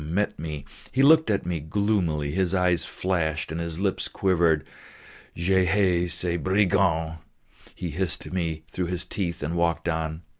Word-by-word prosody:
met 90 Hz, +6 st, -1 dB
me; 75 Hz, -3 st, -5 dB, 0.3 s
he 135 Hz, -, +2 dB
looked 160 Hz, +1 st, +6 dB
at 100 Hz, -4 st, +1 dB
me 85 Hz, -2 st, -1 dB
gloomily, 80 Hz, -3 st, 0 dB
his 95 Hz, +2 st, 0 dB
eyes 90 Hz, -2 st, +2 dB
flashed 80 Hz, -5 st, -1 dB
and 80 Hz, +1 st, -3 dB
his 85 Hz, 0 st, -4 dB
lips 95 Hz, -1 st, 0 dB
quivered. 85 Hz, -6 st, +2 dB, 0.7 s
"Je 95 Hz, +2 st, +2 dB
haïs 90 Hz, -3 st, +2 dB
ces 85 Hz, 0 st, -1 dB
brigands!" 90 Hz, -4 st, +2 dB, 0.6 s
he 85 Hz, -, -4 dB
hissed 90 Hz, +3 st, -2 dB
to -, -, -9 dB
me 80 Hz, -4 st, -2 dB
through 90 Hz, +1 st, -3 dB
his 90 Hz, 0 st, -2 dB
teeth, 85 Hz, -5 st, -3 dB
and 80 Hz, +3 st, -2 dB
walked 85 Hz, -1 st, 0 dB
on. 80 Hz, 0 st, -2 dB
85 Hz, 160 wpm, -26 LUFS, 80-95 Hz, 0.7 s, looked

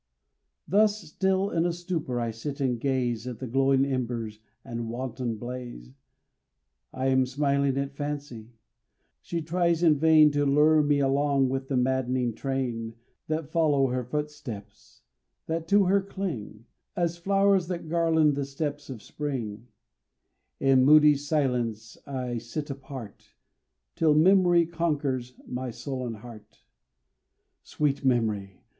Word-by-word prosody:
Thus 210 Hz, +2 st, +3 dB
still 190 Hz, +4 st, -1 dB
in 165 Hz, -, +1 dB
a 175 Hz, -, +1 dB
stupor 170 Hz, -8 st, -3 dB
I 115 Hz, -1 st, -1 dB
sit 140 Hz, +6 st, -6 dB
and 125 Hz, -4 st, 0 dB
gaze 125 Hz, -3 st, -1 dB
At 125 Hz, -3 st, -5 dB
the 130 Hz, -, -6 dB
glowing 135 Hz, +2 st, +2 dB
embers 120 Hz, -5 st, -3 dB, 0.3 s
and 115 Hz, -2 st, -5 dB
wanton 120 Hz, -1 st, -4 dB
blaze; 120 Hz, -, -8 dB, 1.0 s
I 130 Hz, +1 st, -1 dB
am 130 Hz, -1 st, +3 dB
smiling 140 Hz, 0 st, +1 dB
at 140 Hz, 0 st, -2 dB
Fancy; 140 Hz, -6 st, -6 dB, 0.7 s
she 170 Hz, -2 st, -4 dB
tries 170 Hz, +1 st, +1 dB
in 155 Hz, -4 st, +4 dB
vain 155 Hz, -1 st, +6 dB
To 145 Hz, 0 st, +1 dB
lure 150 Hz, +2 st, +4 dB
me 145 Hz, -1 st, +2 dB
along 140 Hz, 0 st, +2 dB
with 135 Hz, 0 st, -3 dB
the 135 Hz, -, 0 dB
mad'ning 125 Hz, -1 st, 0 dB
train 120 Hz, -3 st, -3 dB, 0.3 s
That 155 Hz, -2 st, -3 dB
follow 145 Hz, -5 st, +2 dB
her 125 Hz, 0 st, -1 dB
footsteps 125 Hz, -7 st, -7 dB, 0.4 s
that 165 Hz, 0 st, -3 dB
to 200 Hz, +3 st, +5 dB
her 195 Hz, +2 st, +3 dB
cling, 165 Hz, -, -6 dB, 0.3 s
As 170 Hz, -1 st, -1 dB
flowers 195 Hz, 0 st, +2 dB
that 175 Hz, -2 st, -5 dB
garland 160 Hz, -2 st, +3 dB
the 140 Hz, 0 st, -2 dB
steps 145 Hz, +1 st, -4 dB
of 120 Hz, -6 st, -8 dB
spring; 120 Hz, -7 st, -5 dB, 0.9 s
In 135 Hz, -1 st, +4 dB
moody 150 Hz, +2 st, +7 dB
silence 125 Hz, -7 st, -1 dB
I 125 Hz, -3 st, -3 dB
sit 145 Hz, +6 st, -5 dB
apart, 135 Hz, -5 st, -10 dB, 0.6 s
Till 155 Hz, -2 st, +3 dB
memory 175 Hz, +1 st, +5 dB
conquers 145 Hz, -7 st, -2 dB
my 125 Hz, 0 st, -4 dB
sullen 125 Hz, 0 st, -5 dB
heart. 110 Hz, -1 st, -13 dB, 1.0 s
Sweet 145 Hz, -2 st, -1 dB
Memory! 110 Hz, -7 st, 0 dB
135 Hz, 130 wpm, -27 LUFS, 125-155 Hz, 1.0 s, moody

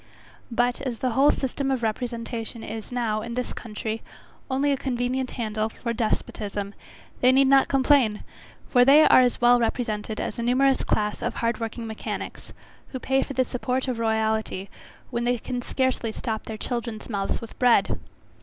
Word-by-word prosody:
But, 245 Hz, +2 st, +1 dB
as 255 Hz, -4 st, -3 dB
the 255 Hz, +1 st, -1 dB
whole 275 Hz, +5 st, +5 dB
system 270 Hz, 0 st, -1 dB
of 260 Hz, -3 st, 0 dB
representation 230 Hz, 0 st, -3 dB
is 220 Hz, +1 st, -7 dB
now, 225 Hz, -3 st, -1 dB
in 235 Hz, +1 st, -5 dB
this 250 Hz, 0 st, -2 dB
country, 220 Hz, 0 st, -5 dB, 0.5 s
only 275 Hz, +2 st, +1 dB
a -, -, +3 dB
convenient 255 Hz, 0 st, -1 dB
handle 215 Hz, -2 st, -1 dB
for 235 Hz, +1 st, -4 dB
despotism, 205 Hz, -2 st, -2 dB, 0.5 s
they 255 Hz, -, +5 dB
need 270 Hz, +1 st, +5 dB
not 270 Hz, 0 st, +5 dB
complain, 265 Hz, -5 st, +3 dB, 0.4 s
for 245 Hz, -2 st, +5 dB
they 285 Hz, +4 st, +7 dB
are -, -, +7 dB
as 245 Hz, -1 st, +2 dB
well 240 Hz, 0 st, +6 dB
represented 220 Hz, -2 st, -2 dB
as 210 Hz, -, -4 dB
a -, -, 0 dB
numerous 260 Hz, +3 st, +3 dB
class 210 Hz, 0 st, 0 dB
of -, -, -2 dB
hard 230 Hz, -1 st, -1 dB
working 230 Hz, +1 st, -4 dB
mechanics, 220 Hz, -1 st, -6 dB, 0.4 s
who 260 Hz, -, -6 dB
pay 265 Hz, +1 st, +1 dB
for 275 Hz, -, -4 dB
the 260 Hz, -, +2 dB
support 255 Hz, +1 st, -2 dB
of 250 Hz, -3 st, -2 dB
royality 220 Hz, -3 st, 0 dB, 0.4 s
when 235 Hz, -, -1 dB
they 245 Hz, 0 st, +1 dB
can 245 Hz, +2 st, -4 dB
scarcely 260 Hz, -3 st, -1 dB
stop 220 Hz, -1 st, -4 dB
their 220 Hz, -, -6 dB
children's 235 Hz, -1 st, -4 dB
mouths 200 Hz, -4 st, -2 dB
with 230 Hz, -, -11 dB
bread. 245 Hz, -2 st, +4 dB
240 Hz, 175 wpm, -25 LUFS, 220-255 Hz, 0.5 s, they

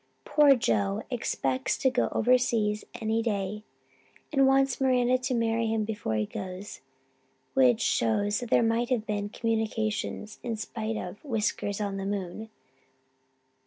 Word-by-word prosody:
Poor 290 Hz, -2 st, +6 dB
Joe 205 Hz, -3 st, 0 dB
expects 135 Hz, -, -1 dB
to 265 Hz, -, +2 dB
go 250 Hz, -, +1 dB
overseas 225 Hz, -3 st, +2 dB, 0.2 s
any 225 Hz, 0 st, 0 dB
day 210 Hz, -2 st, -2 dB, 0.7 s
and 270 Hz, -2 st, +5 dB
wants 270 Hz, -1 st, +2 dB
Miranda 255 Hz, -1 st, +3 dB
to 255 Hz, 0 st, -1 dB
marry 230 Hz, 0 st, +1 dB
him 220 Hz, -1 st, 0 dB
before 210 Hz, -, -3 dB
he 105 Hz, 0 st, +1 dB
goes, 185 Hz, -, -7 dB, 0.7 s
which 125 Hz, -3 st, +4 dB
shows 205 Hz, -, +1 dB
that 245 Hz, -, -6 dB
there 235 Hz, -, +4 dB
have 235 Hz, 0 st, 0 dB
been 205 Hz, -1 st, -2 dB
'communications' 220 Hz, -1 st, -2 dB
in 230 Hz, -2 st, -3 dB
spite 220 Hz, 0 st, -4 dB
of 180 Hz, +1 st, -7 dB
Whiskers 215 Hz, -5 st, -1 dB
on 200 Hz, -2 st, -2 dB
the 195 Hz, 0 st, -3 dB
moon. 200 Hz, +2 st, -4 dB
220 Hz, 135 wpm, -28 LUFS, 205-240 Hz, 0.7 s, Poor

